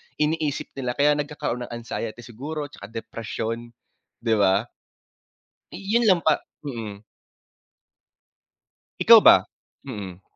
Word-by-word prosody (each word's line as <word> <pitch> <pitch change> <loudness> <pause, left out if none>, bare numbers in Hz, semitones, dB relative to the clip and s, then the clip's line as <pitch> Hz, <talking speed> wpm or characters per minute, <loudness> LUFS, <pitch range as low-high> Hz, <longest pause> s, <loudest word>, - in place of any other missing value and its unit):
iniisip 150 -1 -1
nila 125 -2 -3
kaya 145 +1 +4
nagkakaroon 135 -5 -3
ng - - -14
anxiety 115 0 -5
siguro 145 +6 -6
tsaka 100 - -11
depresyon 115 +1 -5 0.5
di 115 - 0
ba. 100 +2 +4 1.1
Yun 200 +6 0
lang 185 -5 +5
pa, 155 -2 +2 0.2
mhm. 110 -6 -6 2.0
Ikaw - - +9
ba? - - +8 0.4
Mm. 100 -6 -7
120 Hz, 105 wpm, -24 LUFS, 110-150 Hz, 2.0 s, Ikaw